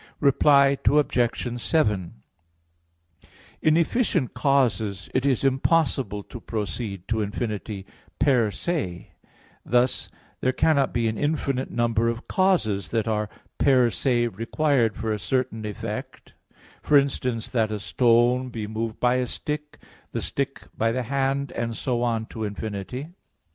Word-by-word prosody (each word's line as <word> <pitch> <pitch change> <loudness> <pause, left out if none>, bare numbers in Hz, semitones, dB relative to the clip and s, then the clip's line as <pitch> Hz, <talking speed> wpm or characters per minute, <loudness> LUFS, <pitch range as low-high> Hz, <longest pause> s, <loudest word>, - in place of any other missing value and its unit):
Reply 140 -1 +5
Obj. 120 -4 +1
7: 105 - +1 1.5
In 155 0 +4
efficient 170 - +1
causes 120 -7 +1
it 130 +2 +1
is 135 -1 +1
impossible 135 -6 +1
to 120 - -10
proceed 105 -3 -4
to 110 -1 0
infinity 105 -1 -4 0.3
per 125 -6 +3
se 105 - -3 0.5
thus, 125 +1 +1 0.3
there 130 - +1
cannot 140 -1 +2
be 115 -1 0
an 110 -1 -2
infinite 140 -3 -1
number 115 -1 +1
of 115 0 -5
causes 165 - +1
that 115 -1 0
are 105 -1 0 0.3
per 130 -4 +4
se 120 -2 +1
required 115 +2 +1
for 110 - -2
a 105 - -3
certain 120 -3 -1
effect; 115 +4 -6 0.5
for 150 - +5
instance, 125 -4 0
that 110 -3 +1
a 105 - -2
stone 120 +3 +3
be 115 -3 -5
moved 110 +1 -4
by 125 +1 +3
a 125 -1 0
stick, 150 +1 -4 0.4
the - - -2
stick - - -3
by 115 +1 +1
the 125 +2 -1
hand, 140 +2 -1
and 115 -1 -3
so 120 -2 -1
on 115 -2 0
to 110 0 -6
infinity. 105 - -5
120 Hz, 135 wpm, -25 LUFS, 110-135 Hz, 1.5 s, Reply